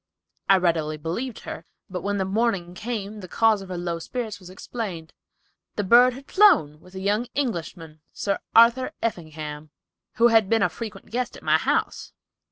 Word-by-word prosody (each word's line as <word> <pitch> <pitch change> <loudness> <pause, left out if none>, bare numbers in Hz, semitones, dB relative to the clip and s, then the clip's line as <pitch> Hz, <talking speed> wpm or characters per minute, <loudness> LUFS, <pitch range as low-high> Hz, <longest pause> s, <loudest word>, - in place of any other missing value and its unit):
I 195 - +7
readily 160 -4 0
believed 190 - -4
her; - - -7 0.2
but 180 -2 -5
when 205 +2 -1
the 190 - 0
morning 195 -3 0
came 215 0 -5
the 185 - -9
cause 220 +2 +2
of 190 - -10
her 180 - -4
low 170 -1 -3
spirits 220 +2 -5
was 180 -2 -13
explained. 185 -4 -6 0.6
The 205 - -1
bird 245 +5 +6
had 270 +2 -12
flown, 320 - +5
with 185 +3 -17
a - - -5
young 205 +4 0
Englishman, 170 - -4
Sir 200 -3 -2 0.2
Arthur 235 +3 +5
Effingham, 155 -7 -5 0.4
who 235 +1 +4
had 225 -4 +4
been 225 -2 +3
a - - +3
frequent 225 -2 -8
guest 250 +1 -3
at - - -15
my - - +3
house." - - -1
200 Hz, 175 wpm, -24 LUFS, 170-230 Hz, 0.6 s, I